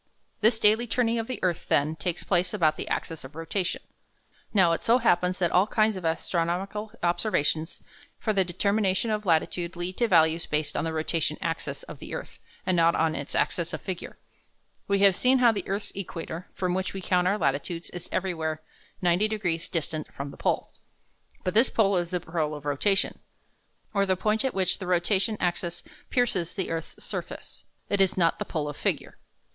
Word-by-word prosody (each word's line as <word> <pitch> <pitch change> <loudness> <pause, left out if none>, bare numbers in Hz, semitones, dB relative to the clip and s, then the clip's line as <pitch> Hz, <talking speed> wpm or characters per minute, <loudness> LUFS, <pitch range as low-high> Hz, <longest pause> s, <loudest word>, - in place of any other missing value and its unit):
This 220 +1 +4
daily 220 +2 +4
turning 235 0 +1
of 225 - -3
the 255 - -3
earth, 175 -3 0
then, 150 +3 +2
takes 165 +2 -3
place 180 +1 +1
about 160 -6 +3
the - - -5
axis 165 -1 -3
of 130 +3 -11
rotation. 175 +3 -2 0.7
Now, 185 -5 +5
it 165 - 0
so 235 +2 +4
happens 180 -6 +2
that 175 -2 +1
all 185 +3 +4
kinds 220 -1 +2
of 185 - -6
astronomical 175 +6 -1
observations 170 -2 0 0.4
for 215 - 0
the 195 -2 +3
determination 200 +3 +1
of 210 -1 -2
latitude 170 +1 +1
lead 175 +1 -4
to 240 - +2
values 165 -3 +4
based 150 -1 -1
on - - 0
the 165 - -1
rotation 160 -1 0
axis 165 -2 -3
of - - -10
the - - -6
earth, - - -8 0.3
and 185 - +2
not 170 0 +4
on 160 -1 +2
its 140 - -5
axis 170 -1 0
of - - -4
figure. 185 -3 -5 0.7
We 200 0 +2
have 200 -2 +6
seen 255 +5 +4
how 245 -2 +6
the 210 - -4
earth's 200 +2 -2
equator, 175 -2 -6
from 180 -1 0
which 190 +1 -2
we 190 - -4
count 180 0 +2
our 200 +3 +2
latitudes, 155 +2 -1
is 175 -1 -8
everywhere 160 -4 -2 0.4
90 180 +4 +3
degrees 180 -7 -2
distant 155 -2 -3
from 140 +1 -6
the - - -11
pole. - - 0 0.7
But 185 - -1
this 230 +4 +5
pole 200 -3 +3
is 175 -1 -1
the 180 0 -1
pole 160 -3 -2
of 145 -1 -10
rotation, 190 +8 +1 0.7
or 200 -1 +2
the 185 -1 +2
point 215 +4 +1
at 265 -5 -1
which 185 -2 +2
the 185 - -5
rotation 190 +4 +2
axis 175 -1 -2 0.3
pierces 200 -9 0
the 190 -4 -2
earth's 165 -1 -5
surface. - - -6 0.2
It 200 -1 +1
is 190 -1 +3
not 170 -2 +3
the - - -2
pole 150 -2 -2
of 145 - -5
figure. - - -2
180 Hz, 195 wpm, -27 LUFS, 165-200 Hz, 0.7 s, have